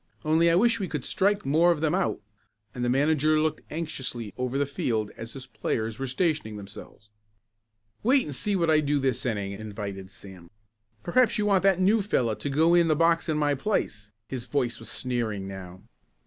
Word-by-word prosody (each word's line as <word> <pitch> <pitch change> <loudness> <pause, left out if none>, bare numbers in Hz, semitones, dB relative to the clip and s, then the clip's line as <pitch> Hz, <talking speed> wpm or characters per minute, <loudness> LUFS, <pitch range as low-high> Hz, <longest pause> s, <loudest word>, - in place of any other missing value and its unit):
Only 160 +2 +4
I 165 - +4
wish 230 +5 +3
we 195 - -2
could 150 -6 -4
strike 200 +1 +1
more 165 +5 +4
of 165 - 0
them 155 -1 +1
out," 110 - 0 0.5
and 125 - -4
the 120 - +1
manager 155 +3 +3
looked 155 0 0
anxiously 130 -9 -4
over 125 +1 -2
the 145 - +2
field 115 -6 -2
as 115 +1 -8
his 135 -2 -8
players 110 -2 -3
were 135 - -2
stationing 140 - -1
themselves. 100 +1 -11 0.9
"Wait 260 +4 +4
and 150 - -5
see 205 +9 -1
what 170 -3 +2
I 155 - +5
do 145 -1 +1
this 130 -3 0
inning," 100 -4 -2
invited 100 -2 -6
Sam. 95 -3 -13 0.5
"Perhaps 245 - +3
you 210 - 0
want 200 -2 +3
that 195 -2 +3
new 205 +4 +4
fellow 125 - +1
to 145 - -4
go 160 +5 +3
in 170 -1 +5
the 155 - +3
box 165 +1 +2
in 155 - +1
my 145 -1 +2
place." 105 - -2 0.2
His 125 -3 -5
voice 125 -5 -1
was 115 - -9
sneering 115 -6 -3
now. 95 -1 -9
140 Hz, 195 wpm, -27 LUFS, 110-165 Hz, 0.9 s, I